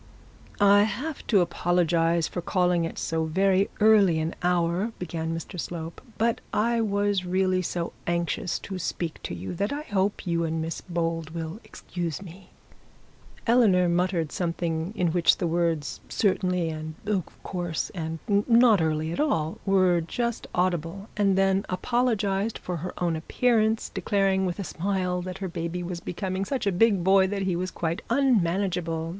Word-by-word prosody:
'I 205 Hz, 0 st, +6 dB
have 260 Hz, +9 st, -3 dB
to 200 Hz, -5 st, +4 dB
apologise 170 Hz, -1 st, +1 dB
for 175 Hz, -, -4 dB
calling 180 Hz, -1 st, +1 dB
at -, -, -9 dB
so 160 Hz, 0 st, -1 dB
very 190 Hz, +4 st, +2 dB
early 210 Hz, -6 st, +5 dB
an 160 Hz, +1 st, -1 dB
hour,' 180 Hz, +4 st, +1 dB
began 165 Hz, -2 st, -4 dB
Mr 165 Hz, +3 st, -5 dB
Slope, 165 Hz, -1 st, -5 dB, 0.2 s
'but 230 Hz, +1 st, +1 dB
I 230 Hz, +2 st, +1 dB
was 205 Hz, -2 st, +1 dB
really 185 Hz, 0 st, +1 dB
so 170 Hz, -1 st, -3 dB
anxious 170 Hz, +1 st, -1 dB
to 190 Hz, -2 st, -6 dB
speak 165 Hz, -1 st, -3 dB
to -, -, -5 dB
you 90 Hz, +2 st, -5 dB
that 200 Hz, +4 st, -1 dB
I 290 Hz, +1 st, -3 dB
hope 205 Hz, -4 st, -1 dB
you 170 Hz, -1 st, 0 dB
and 165 Hz, 0 st, -1 dB
Miss 165 Hz, +1 st, -4 dB
Bold 165 Hz, -2 st, -2 dB
will 165 Hz, +4 st, -5 dB
excuse 170 Hz, -3 st, -5 dB
me.' 190 Hz, 0 st, -12 dB, 1.0 s
Eleanor 215 Hz, -7 st, +4 dB
muttered 175 Hz, -2 st, 0 dB
something 165 Hz, 0 st, -2 dB
in 180 Hz, -5 st, +1 dB
which 170 Hz, 0 st, +3 dB
the -, -, -1 dB
words 165 Hz, -3 st, -1 dB
'certainly', 180 Hz, -4 st, +1 dB
and 155 Hz, 0 st, -6 dB
'of 200 Hz, -4 st, 0 dB, 0.2 s
course', 175 Hz, -3 st, -3 dB
and 165 Hz, -2 st, -4 dB
'not 220 Hz, 0 st, +5 dB
early 160 Hz, 0 st, 0 dB
at -, -, -4 dB
all', 165 Hz, -, 0 dB
were 185 Hz, -3 st, +4 dB
just 235 Hz, +7 st, -3 dB
audible, 180 Hz, +2 st, -1 dB
and 200 Hz, -2 st, +2 dB
then 195 Hz, 0 st, +3 dB
apologised 215 Hz, 0 st, 0 dB
for 180 Hz, -1 st, -4 dB
her 180 Hz, +3 st, -5 dB
own 170 Hz, -2 st, 0 dB
appearance, 220 Hz, +6 st, +1 dB
declaring 195 Hz, -2 st, +1 dB
with 175 Hz, -, -3 dB
a 200 Hz, -, -3 dB
smile, 180 Hz, 0 st, -1 dB
that 180 Hz, 0 st, -6 dB
her 195 Hz, -1 st, -4 dB
baby 170 Hz, 0 st, -4 dB
was 175 Hz, 0 st, -4 dB
becoming 185 Hz, +2 st, -3 dB
such 255 Hz, +3 st, -2 dB
a 200 Hz, -, +2 dB
big 195 Hz, 0 st, +3 dB
boy 190 Hz, +1 st, +5 dB
that 195 Hz, 0 st, -2 dB
he 185 Hz, -2 st, 0 dB
was 185 Hz, +2 st, -2 dB
quite 165 Hz, -1 st, -3 dB
unmanageable. 180 Hz, -9 st, +1 dB
180 Hz, 160 wpm, -26 LUFS, 170-200 Hz, 1.0 s, I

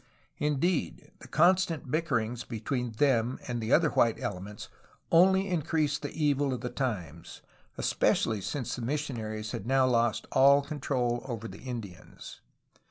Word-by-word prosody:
Indeed, 150 Hz, +4 st, -1 dB
the -, -, -12 dB
constant 170 Hz, -4 st, +2 dB
bickerings 125 Hz, -7 st, -1 dB
between 120 Hz, +1 st, -3 dB
them 125 Hz, -1 st, +2 dB
and 120 Hz, -2 st, -3 dB
the 110 Hz, +2 st, -3 dB
other 160 Hz, -2 st, +5 dB
white 115 Hz, -2 st, +2 dB
elements 100 Hz, +3 st, -6 dB, 0.4 s
only 190 Hz, +3 st, +5 dB
increased 155 Hz, -4 st, 0 dB
the -, -, -4 dB
evil 145 Hz, -3 st, 0 dB
of 120 Hz, -, -7 dB
the 125 Hz, -, -4 dB
times, 90 Hz, -, -4 dB, 0.3 s
especially 110 Hz, -3 st, +1 dB
since 125 Hz, +5 st, -3 dB
the -, -, -6 dB
missionaries 115 Hz, -6 st, -3 dB
had 95 Hz, -, -5 dB
now 135 Hz, 0 st, +4 dB
lost 120 Hz, -3 st, +1 dB
all 140 Hz, +2 st, +6 dB
control 130 Hz, -5 st, -1 dB
over 115 Hz, -3 st, -5 dB
the -, -, -10 dB
Indians. 115 Hz, -8 st, -8 dB
130 Hz, 140 wpm, -29 LUFS, 115-150 Hz, 0.4 s, all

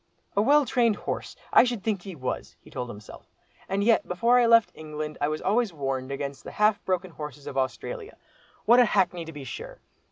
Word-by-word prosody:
"A 200 Hz, -, +4 dB
well 290 Hz, +5 st, +5 dB
trained 235 Hz, -3 st, +2 dB
horse! -, -, -5 dB, 0.2 s
I -, -, +8 dB
should 240 Hz, -5 st, -2 dB
think 210 Hz, -4 st, -1 dB
he 190 Hz, -1 st, -8 dB
was," 130 Hz, -3 st, -4 dB
he -, -, -18 dB
told 125 Hz, -2 st, -4 dB
himself; 105 Hz, -2 st, -11 dB, 0.4 s
"and 195 Hz, +1 st, 0 dB
yet, 230 Hz, +1 st, +3 dB
before 235 Hz, +7 st, +3 dB
I 240 Hz, -, +4 dB
left 230 Hz, -1 st, +5 dB
England, 155 Hz, -1 st, -6 dB
I 145 Hz, -, +2 dB
was 155 Hz, +1 st, -3 dB
always 225 Hz, +3 st, +2 dB
being 165 Hz, -5 st, -18 dB
warned 135 Hz, -1 st, -2 dB
against 140 Hz, 0 st, -5 dB
the -, -, -9 dB
half 210 Hz, -1 st, +2 dB
broken 185 Hz, -1 st, -1 dB
horses 150 Hz, -3 st, -8 dB
of -, -, -7 dB
Australia. 425 Hz, -, -3 dB, 0.5 s
What 240 Hz, +3 st, +7 dB
a 245 Hz, -, +7 dB
hackney 180 Hz, -5 st, +1 dB
to 160 Hz, -, -8 dB
be 145 Hz, -3 st, -8 dB
sure! -, -, -8 dB
185 Hz, 215 wpm, -26 LUFS, 145-230 Hz, 0.5 s, I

